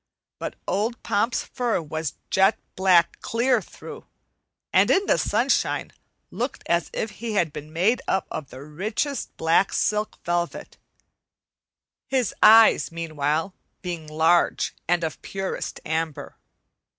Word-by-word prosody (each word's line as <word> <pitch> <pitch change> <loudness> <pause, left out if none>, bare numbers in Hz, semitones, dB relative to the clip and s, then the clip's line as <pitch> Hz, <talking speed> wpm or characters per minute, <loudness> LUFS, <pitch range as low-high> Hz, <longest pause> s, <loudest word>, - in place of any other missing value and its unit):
But - - -5
old 225 +4 -1
Pomp's 225 +4 0
fur 240 -5 -1
was 155 -2 -4 0.2
jet 190 0 +4 0.2
black 185 -2 +3
clear 240 0 +1
through, - - -11 0.7
and - - +5
in 390 - +3
the - - +2
sunshine - - 0 0.4
looked - - -4
as - - 0
if - - -3
he 230 -2 -5
had 170 -7 +1
been 150 +1 -8
made 190 +9 +2
up 190 - +1
of 150 -4 -5
the 130 +2 -10
richest 210 - -3
black 165 +4 +3
silk 210 +1 0
velvet, 175 0 -3 1.3
his 260 -5 0
eyes, 225 -4 +7
meanwhile, 160 +1 -2 0.3
being 170 -3 -5
large 160 +3 +2
and 175 0 +2
of 160 - -3
the - - -11
purest 195 -1 -4
amber. 160 -1 -3
175 Hz, 130 wpm, -24 LUFS, 160-220 Hz, 1.3 s, eyes